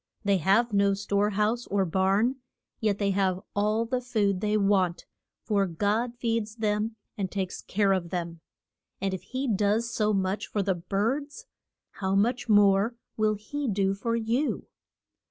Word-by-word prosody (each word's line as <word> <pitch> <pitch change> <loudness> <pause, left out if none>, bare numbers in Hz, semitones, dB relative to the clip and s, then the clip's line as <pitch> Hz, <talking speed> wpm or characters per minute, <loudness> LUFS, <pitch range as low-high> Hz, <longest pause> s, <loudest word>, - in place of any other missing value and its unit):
They 200 -1 +3
have 205 +7 +3
no 200 0 +3
store 200 +1 0
house 215 +4 0
or 195 -1 +1
barn, 195 +8 +2 0.4
yet 210 -3 +1
they 200 -1 +1
have 190 -2 +1 0.2
all 215 +3 +1
the 250 +2 -1
food 210 -6 0
they 210 0 +1
want, 195 -4 +1 0.4
for 200 -3 +1
God 210 +8 0
feeds 225 -2 -1
them 215 0 -1 0.2
and 190 -2 -1
takes 190 -2 -3
care 200 0 +1
of 175 -3 -2
them. 170 -2 -4 0.6
And 195 0 -1
if 185 - -4
he 260 +8 -4
does 215 +2 +1
so 215 -1 +1
much 195 0 -1
for 205 - -1
the 195 - +1
birds, 220 - -2 0.5
how 190 0 -2
much 240 +4 +1
more 205 +2 +4 0.2
will 215 -1 +2
he 280 +8 -4
do 195 -2 +1
for 230 +4 -2
you? 235 +6 -1
205 Hz, 160 wpm, -27 LUFS, 195-225 Hz, 0.6 s, more